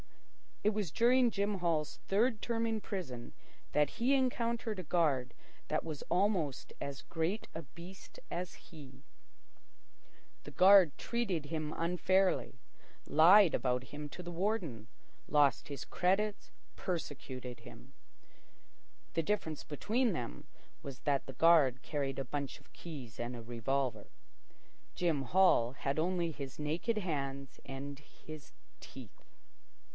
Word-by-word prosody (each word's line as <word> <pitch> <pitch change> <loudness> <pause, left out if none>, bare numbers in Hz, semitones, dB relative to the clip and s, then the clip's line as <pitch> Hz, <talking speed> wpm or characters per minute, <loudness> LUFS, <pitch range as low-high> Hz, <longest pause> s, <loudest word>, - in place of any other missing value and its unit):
It 210 - +4
was 205 -7 -1
during 245 +4 +4
Jim 205 -1 -1
Hall's 165 -4 0
third 220 +3 +2
term 230 -1 -1
in 220 -1 -1
prison 130 - -5 0.4
that 150 -1 +2
he 245 +4 +3
encountered 235 -4 0
a - - -4
guard 145 -7 +1 0.4
that 155 - 0
was 155 -3 -5
almost 175 -6 0
as 140 -2 -5
great 170 +6 -2
a 165 - -5
beast 170 +7 -12
as 180 +1 -3
he. 135 -4 -14 1.4
The - - -9
guard 190 -5 +7
treated 200 -10 -1
him 155 0 -3
unfairly, 180 -3 +1 0.5
lied 175 +4 +7
about 125 0 0
him 150 +4 -7
to 180 - -8
the 175 - -6
warden, 170 - -2 0.4
lost 145 -2 +3
his 140 -1 -6
credits, 200 +3 0 0.2
persecuted 130 -7 -5
him. - - -13 1.2
The 165 - +1
difference 160 -5 -2
between 220 - 0
them 60 - -5 0.4
was 135 -3 -7
that 140 -2 +1
the 135 - -7
guard 145 -6 +5
carried 140 -3 -2
a 135 - -2
bunch 140 +1 -4
of - - -25
keys 135 -10 -9
and 120 +1 -3
a 120 - -7
revolver. 120 +3 -2 0.9
Jim 165 -6 +1
Hall 135 -6 +4
had 135 +1 -2
only 170 0 0
his 140 -3 -7
naked 165 +9 -1
hands 140 -7 -4
and 135 +1 -6
his 155 0 -12 0.3
teeth. - - -12
160 Hz, 130 wpm, -34 LUFS, 135-190 Hz, 1.4 s, guard